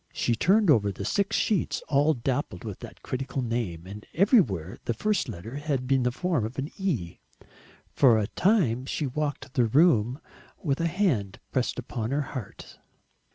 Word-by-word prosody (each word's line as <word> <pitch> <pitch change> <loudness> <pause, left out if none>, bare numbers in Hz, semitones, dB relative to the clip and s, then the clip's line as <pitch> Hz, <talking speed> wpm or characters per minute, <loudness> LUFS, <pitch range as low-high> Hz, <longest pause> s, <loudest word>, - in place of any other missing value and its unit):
She 120 - 0
turned 190 - +4
over 105 -7 +3
the 100 0 -6
six 200 - 0
sheets, 210 -6 0
all 145 +2 +3
dappled 125 -6 -2
with - - -6
that - - -11
critical 135 0 -3
name, 115 -9 -3
and 105 +3 -9
everywhere 155 - +2
the 120 - -1
first 205 - 0
letter 110 +6 -7
had 145 -4 -2
the 130 -2 +2
form 170 -1 -1
of 110 +4 -5
an 140 +2 -3
E! 130 - -2 0.7
For 120 -5 +5
a 105 - +1
time 135 - +1
she 150 - -2
walked 145 0 -3
the 125 - +3
room 130 -1 +3 0.4
with 140 -1 0
a 170 - +2
hand 160 - 0
pressed 130 -2 0
upon 115 -2 -4
her 140 +3 0
heart. 125 -7 -8
130 Hz, 165 wpm, -27 LUFS, 110-155 Hz, 0.7 s, For